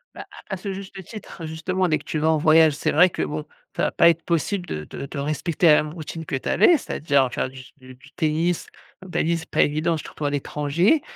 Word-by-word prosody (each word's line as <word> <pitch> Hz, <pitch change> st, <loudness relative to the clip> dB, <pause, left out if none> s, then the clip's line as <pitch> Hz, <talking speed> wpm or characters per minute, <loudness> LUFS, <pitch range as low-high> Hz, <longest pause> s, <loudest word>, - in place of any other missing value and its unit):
Bah -, -, -8 dB, 0.2 s
à -, -, -4 dB
à -, -, -8 dB
ce 195 Hz, +1 st, -5 dB
juste 195 Hz, 0 st, -8 dB
titre, 205 Hz, -6 st, -9 dB
justement, 180 Hz, +4 st, -1 dB
dès 155 Hz, -, +2 dB
que 145 Hz, -, -14 dB
tu 155 Hz, -, -4 dB
vas 155 Hz, +1 st, +2 dB
en 160 Hz, -, +2 dB
voyage, 155 Hz, 0 st, +5 dB
c'est 145 Hz, -, -1 dB
vrai 180 Hz, +5 st, +6 dB
que -, -, -5 dB
bon, -, -, -3 dB, 0.3 s
ça -, -, -1 dB
va -, -, +1 dB
pas 170 Hz, -, +5 dB
être 165 Hz, 0 st, 0 dB
possible 175 Hz, +3 st, -1 dB
de 75 Hz, -, -5 dB
de -, -, -6 dB
de 140 Hz, -, -8 dB
respecter 155 Hz, +4 st, 0 dB
la 150 Hz, -1 st, +6 dB
même 150 Hz, +1 st, -7 dB
routine 160 Hz, 0 st, -7 dB
que 140 Hz, -, -3 dB
tu 130 Hz, -, -3 dB
avais, 345 Hz, -, +5 dB
c'est-à-dire 140 Hz, -, 0 dB
faire 130 Hz, -, -2 dB
du 130 Hz, -, -12 dB
s 130 Hz, -, -15 dB
du 130 Hz, -1 st, -14 dB
du 125 Hz, -, -19 dB
tennis, 160 Hz, +2 st, 0 dB, 0.4 s
un -, -, -11 dB
tannis 170 Hz, -1 st, 0 dB
c'est 160 Hz, -, -11 dB
pas -, -, +2 dB
évident 155 Hz, +3 st, +1 dB
surtout 155 Hz, -1 st, -6 dB
à -, -, +2 dB
l'étranger 150 Hz, -, +1 dB
160 Hz, 255 wpm, -23 LUFS, 150-175 Hz, 0.4 s, vrai